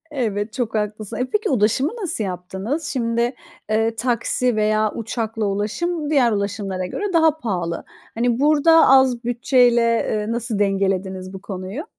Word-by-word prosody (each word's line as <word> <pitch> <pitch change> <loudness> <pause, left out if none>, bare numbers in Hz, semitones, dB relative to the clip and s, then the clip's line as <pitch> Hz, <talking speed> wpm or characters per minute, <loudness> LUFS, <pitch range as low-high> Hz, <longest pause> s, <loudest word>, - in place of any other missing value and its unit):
Evet, 215 -4 -2
çok 235 -3 -3
haklısın. 215 +1 -3
E, 250 - 0
peki 425 0 0
ulaşımı 250 +3 +2
nasıl 330 - -2
yaptınız? 190 - -4
Şimdi, 235 -1 0 0.4
eee, 225 +1 +1
taksi 245 0 0
veya 215 0 +1
uçakla 225 -1 -3
ulaşım 290 - -2
diğer 265 -6 +3
ulaşımlara 200 -2 -2
göre 395 - -4
daha 320 -2 +4
pahalı. 175 - -3 0.3
Hani, 235 +1 +1
burada 310 +3 +5
az 260 -2 +4
bütçeyle, 245 0 +3
eee, 230 -2 0
nasıl 230 -2 -2
dengelediniz 190 -1 -1
bu 190 - -8
konuyu? 195 - -6
230 Hz, 140 wpm, -21 LUFS, 205-255 Hz, 0.4 s, burada